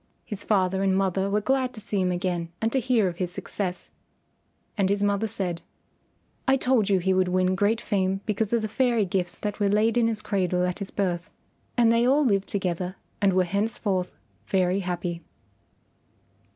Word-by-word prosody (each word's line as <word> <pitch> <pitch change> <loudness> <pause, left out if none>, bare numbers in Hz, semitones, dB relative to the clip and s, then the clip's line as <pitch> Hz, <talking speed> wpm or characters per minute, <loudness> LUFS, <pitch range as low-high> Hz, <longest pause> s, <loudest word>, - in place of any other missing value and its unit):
His 205 -1 -6
father 190 -2 +1
and 190 -1 +2
mother 195 0 +1
were 210 +1 +1
glad 260 +2 0
to - - -8
see 205 -2 -1
him 180 0 +1
again 175 -2 -2
and 225 +1 0
to 265 - +2
hear 240 -5 +2
of 175 -2 -4
his 180 -1 -2
success, 185 0 -5 0.8
and 195 -3 +1
his 200 0 +1
mother 205 +2 +1
said, 185 -6 -3 0.9
"I 265 0 +5
told 250 -6 +2
you 195 - +4
he 190 +1 +1
would 185 0 +2
win 185 0 +2
great 205 +4 +2
fame 195 -3 0
because 215 0 -1
of 235 -2 +1
the - - 0
fairy 235 -1 +1
gifts 180 -1 -1
that 210 0 -4
were 205 -1 +2
laid 220 +3 +3
in 230 - +3
his 220 -2 -1
cradle 180 -2 0
at 180 +2 -3
his 200 - -4
birth." 180 -3 -2 0.5
And 235 -1 +5
they 235 +1 +3
all 285 +3 +4
lived 200 -5 +2
together 185 -1 -2 0.3
and 195 -2 +4
were 185 0 +4
henceforth 195 -1 -1 0.3
very 185 0 +2
happy. 175 -2 -3
195 Hz, 190 wpm, -26 LUFS, 185-215 Hz, 0.9 s, I